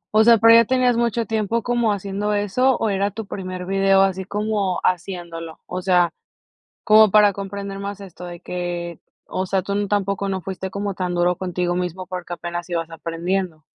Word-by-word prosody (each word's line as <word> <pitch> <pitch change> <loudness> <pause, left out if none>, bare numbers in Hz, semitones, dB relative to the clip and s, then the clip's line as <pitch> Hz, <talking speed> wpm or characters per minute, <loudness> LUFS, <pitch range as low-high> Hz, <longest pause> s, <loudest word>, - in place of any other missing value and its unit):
O 220 - +7
sea, 230 0 +7
¿pero 230 +2 +7
ya 230 - +8
tenías 255 -1 +2
mucho 235 -1 0
tiempo 220 +1 -1
como 240 -2 +1
haciendo 200 +1 -2
eso, 235 +6 +2
o 220 - 0
era 200 +1 +1
tu 220 +2 -7
primer 185 -2 -6
video, 195 0 +3
así 190 -1 -1
como 205 -2 -1
haciéndolo? 170 -3 -3
O 180 +1 -5
sea, 180 -2 +3 0.7
como 215 0 +7
para 210 0 +6
comprender 200 0 -6
más 200 0 -5
esto 180 -2 -10
de 175 -1 -8
que, 175 -1 -5 0.3
o 185 - -2
sea, 190 0 0
¿tun 200 +1 -2
tampoco 200 -1 0
no 190 -1 -2
fuiste 190 +1 -5
como 200 +1 -3
tan 180 -1 -2
duro 175 +1 +2
contigo 180 -1 -2
mismo 180 +1 -3
porque 180 -1 -5
apenas 175 +1 -6
ibas 165 -1 -2
aprendiendo? 165 0 -3
195 Hz, 185 wpm, -22 LUFS, 180-205 Hz, 0.7 s, ya